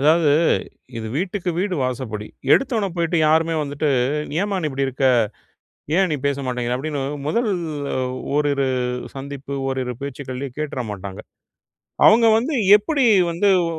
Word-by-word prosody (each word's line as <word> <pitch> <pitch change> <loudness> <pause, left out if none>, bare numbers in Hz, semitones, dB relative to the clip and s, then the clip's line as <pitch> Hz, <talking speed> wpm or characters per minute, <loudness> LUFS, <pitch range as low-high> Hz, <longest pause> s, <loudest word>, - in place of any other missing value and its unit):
அதாவது 155 +1 +4 0.7
இது 110 - -5
வீட்டுக்கு 185 +2 -2
வீடு 190 0 0
வாசப்படி. 120 -4 -4 0.3
எடுத்தோனே 230 -7 +2
போயிட்டு 170 0 0
யாருமே 160 +1 +3
வந்துட்டு 145 +1 -2 0.5
"ஏம்மா 200 -1 -1
நீ 155 - 0
இப்படி 135 0 -1
இருக்க? 135 +1 0 0.9
ஏன் 190 -1 +3
நீ - - +1
பேசமாட்டேங்குற" 125 -3 -1
அப்படின்னு 145 +1 -3 0.3
முதல் 230 +8 +1 0.9
ஓரிரு 145 -2 +1 0.5
சந்திப்பு 140 0 -6
ஓரிரு 130 -2 -2
பேச்சுகளிலேயே 135 -1 -6
கேட்றமாட்டாங்க. 105 -10 -5 0.9
அவங்க 230 +2 +6
வந்து 275 +7 -2 0.2
எப்படி 275 +6 0 0.3
வந்து 170 +5 +1 0.2
ஒ 165 - -4
145 Hz, 120 wpm, -21 LUFS, 130-175 Hz, 0.9 s, அவங்க